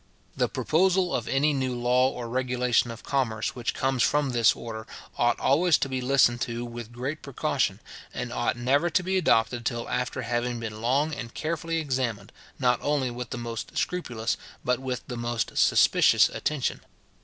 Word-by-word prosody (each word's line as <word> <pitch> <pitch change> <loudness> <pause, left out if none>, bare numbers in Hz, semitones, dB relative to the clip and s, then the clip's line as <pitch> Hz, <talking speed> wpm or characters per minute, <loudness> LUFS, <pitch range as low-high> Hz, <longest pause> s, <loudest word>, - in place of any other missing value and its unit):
The - - +1
proposal 185 +2 +2
of 115 -2 -1
any 145 +3 +2
new 130 -2 -1
law 125 +2 +3
or 120 -3 -6
regulation 125 -1 +1
of 115 0 -8
commerce 115 -5 -1
which 120 -2 -3
comes 135 -1 0
from 145 0 +2
this 115 -4 +4
order, 110 -1 -7 0.3
ought 120 0 +2
always 165 +4 +4
to - - -1
be 130 -1 -3
listened 125 -2 +3
to 120 0 -3
with 120 -1 -8
great 130 +6 -4
precaution, 140 -3 -1 0.3
and - - -5
ought - - 0
never 140 +8 +2
to 180 - +1
be 190 +1 0
adopted 120 -6 +2
till 120 -1 -2
after 125 +1 -2
having 120 +1 -1
been 110 -1 -6
long 140 +6 +1
and 120 -5 -7
carefully 165 +1 -2
examined, 130 -9 -2 0.3
not 125 -2 +2
only 145 -4 0
with 125 +1 -6
the - - -4
most 115 -1 -6
scrupulous, 120 -10 -1 0.3
but 125 0 +1
with 130 -2 -4
the 125 - -6
most 120 -1 -2
suspicious - - +5
attention. 145 -3 -2
125 Hz, 175 wpm, -26 LUFS, 120-140 Hz, 0.3 s, suspicious